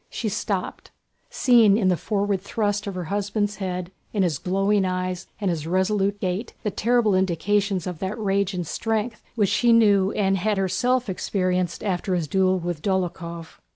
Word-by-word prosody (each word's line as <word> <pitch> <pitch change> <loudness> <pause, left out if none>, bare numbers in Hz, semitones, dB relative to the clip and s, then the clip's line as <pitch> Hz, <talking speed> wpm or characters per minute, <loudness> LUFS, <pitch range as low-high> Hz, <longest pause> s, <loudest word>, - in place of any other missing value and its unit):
She 220 - -3
stopped, 200 -2 -3 0.4
seeing 230 -5 +5
in 195 -4 +2
the 180 - +3
forward 200 0 -1
thrust 205 +1 -1
of 195 - -4
her 180 - -3
husband's 205 +2 -1
head, 185 -2 -4 0.2
in 205 -3 +2
his 165 -6 0
glowing 195 +2 +1
eyes 185 -1 -2
and 200 -4 0
his 160 -2 -4
resolute 195 +3 +1
gait, 190 +5 -3
the 210 - -1
terrible 235 0 +2
indications 190 +1 +1
of 180 -3 -5
that 190 +3 -3
rage 200 -2 0
and 175 -1 -2
strength 220 +5 -2
which 205 -5 +2
she 235 +3 +3
knew 205 -4 +5
and 195 -1 +1
had 210 +3 0
herself 240 +7 +1
experienced 185 -2 -1
after 185 -2 -1
his 170 -3 -1
duel 190 +2 +2
with 175 -3 -4
Dólokhov. 170 -3 -3
195 Hz, 170 wpm, -24 LUFS, 185-210 Hz, 0.4 s, seeing